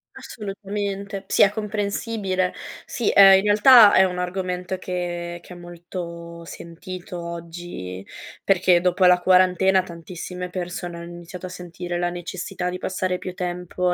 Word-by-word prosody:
Assolutamente, 200 -1 -5
sì - - +1
è 200 - +7
comprensibile. 205 -2 -2 0.3
Sì, 235 - -1
ehm, 195 -1 +8
in 190 - 0
realtà 210 +1 +8
è 190 - +7
un 180 -1 -1
argomento 180 0 -3
che 175 -1 -4
che 180 - -12
è - - -11
molto 170 -1 -8
sentito 175 +2 -8
oggi, 170 - -7 0.4
perché 185 -2 +4
dopo 180 +1 +2
la 180 0 +6
quarantena, 185 +1 +4
tantissime 180 +1 -7
persone 175 -1 -5
hanno 170 - -8
iniziato 175 +1 -9
a - - -9
sentire 175 0 -6
la 175 0 -1
necessità 180 +1 -4
di 180 - -4
passare 185 0 -2
più 185 - -7
tempo 180 0 -2
180 Hz, 140 wpm, -23 LUFS, 175-190 Hz, 0.4 s, ehm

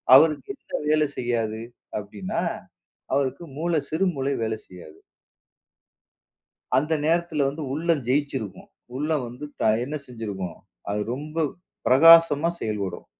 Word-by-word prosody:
அவருக்கு 155 - +5
எந்த - - -5
வேலை 155 0 +4
செய்யாது? 115 -2 -1 0.4
அப்படின்னா 100 -2 -4 0.7
அவருக்கு 140 +3 0
மூளை, 165 0 +1
சிறு 165 +5 +1
மூளை 135 +1 0
வேலை 110 0 -1
செய்யாது. 85 -4 -13 1.8
அந்த 150 +4 -1
நேரத்துல 165 -3 +1
வந்து 150 +3 -5
உள்ளம் 165 -2 +1
ஜெயிச்சிருக்கும். 130 -8 -2 0.3
உள்ள 150 +4 -2 0.2
வந்து 125 +5 -7 0.4
என்ன 145 +4 -4
செஞ்சிருக்கும், 100 -8 -5 0.3
அது 105 +1 -1
ரொம்ப 150 +4 -8 0.5
பிரகாசமா 165 +2 +7
செயல்படும். 105 -3 -3
140 Hz, 110 wpm, -25 LUFS, 110-155 Hz, 1.8 s, பிரகாசமா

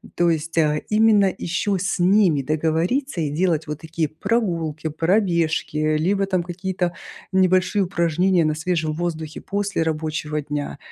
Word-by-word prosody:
То 175 0 +3
есть, 165 0 -2
а, 150 -2 +2
именно 210 -3 +4
ещё 190 +3 -1
с 195 +2 -1
ними 180 -4 +4
договориться 165 - 0
и 150 - -1
делать 160 -1 0
вот 150 0 -5
такие 160 -1 -2
прогулки, 165 -5 -1
пробежки, 165 -2 0 0.2
либо 195 +6 +1
там 185 -2 0
какие-то 180 0 -3 0.4
небольшие 185 +1 +3
упражнения 175 0 +1
на 155 - +1
свежем 160 -1 -1
воздухе 160 -2 -4
после 200 -4 -1
рабочего 155 -1 -2
дня, 145 -1 -4
170 Hz, 135 wpm, -22 LUFS, 155-190 Hz, 0.4 s, именно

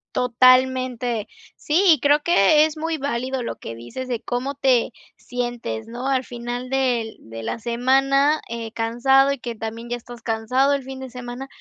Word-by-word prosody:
Totalmente. 255 -2 +3 0.3
Sí, 320 +6 +1
y 310 - 0
creo 290 +1 +3
que 305 - +5
es 315 0 -4
muy 325 +1 -2
válido 260 -2 -2
lo - - -5
que 115 - -8
dices 245 - -7
de 245 -3 -2
cómo 255 +3 -3
te 255 -3 +2 0.3
sientes, 240 - -4
¿no? 245 +3 -5
Al 265 -1 +1
final 245 +1 -6
del 245 -4 0
de 115 0 -9
la 230 - -3
semana, 270 +5 +2
eh, 230 -1 -5
cansado 240 +4 +3
y 280 - -2
que 240 -1 -5
también 225 +1 -6
ya 240 - -2
estás 240 0 -12
cansado 250 +5 +1
el 280 - 0
fin 265 0 -8
de 260 -2 -8
semana, 250 +1 -7
250 Hz, 175 wpm, -22 LUFS, 235-270 Hz, 0.3 s, que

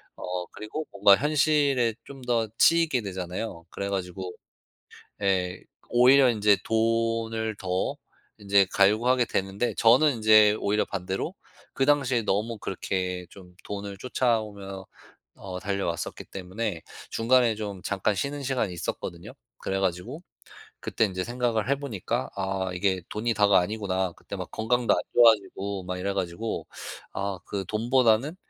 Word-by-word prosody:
어 90 0 -4
그리고 130 +9 -5
뭔가 100 0 +6
현실에 145 -4 +2
좀 135 -1 -11
더 120 -3 0
치이게 165 -6 +4
되잖아요. 90 -2 -5
그래 100 +3 -4
가지고 95 -1 -4 0.9
예 90 -2 +1 0.3
오히려 125 +2 +6
인제 105 -3 +3
돈을 115 0 0
더 90 -1 -2 0.4
인제 100 -1 +3
갈구하게 115 +5 +4
되는데 95 +3 -1
저는 125 +4 +5
인제 110 -1 +6
오히려 105 +1 +1
반대로 95 - -3 0.4
그 135 +1 0
당시에 135 -5 +3
너무 105 +2 -1
그렇게 90 -1 -3
좀 90 -2 -15
돈을 100 -1 -6
쫓아오며 105 -6 -2 0.5
어 95 -1 -7
달려왔었기 95 -4 -3
때문에 95 -1 -5 0.3
중간에 120 0 +3
좀 100 -3 -6
잠깐 100 +1 0
쉬는 140 +8 -3
시간이 130 -7 -1
있었거든요. 85 0 -5 0.3
그래 95 0 -2
가지고 95 - -2 0.6
그때 115 - +1
인제 95 -2 -3
생각을 120 -1 -1
해 140 - +4
보니까 105 - -3
'아 95 -1 -2
이게 95 0 0
돈이 115 +2 -1
다가 105 -2 +5
아니구나.' 95 -1 -1
그때 - - -9
막 - - -7
건강도 120 +2 +1
안 - - +1
좋아지고 100 -4 +3
막 90 0 -4
이래 100 +2 -2
가지고 95 +4 -3 0.5
아 100 -1 -3
그 100 -2 -4
돈보다는 120 - +2
105 Hz, 300 characters per minute, -26 LUFS, 95-120 Hz, 0.9 s, 뭔가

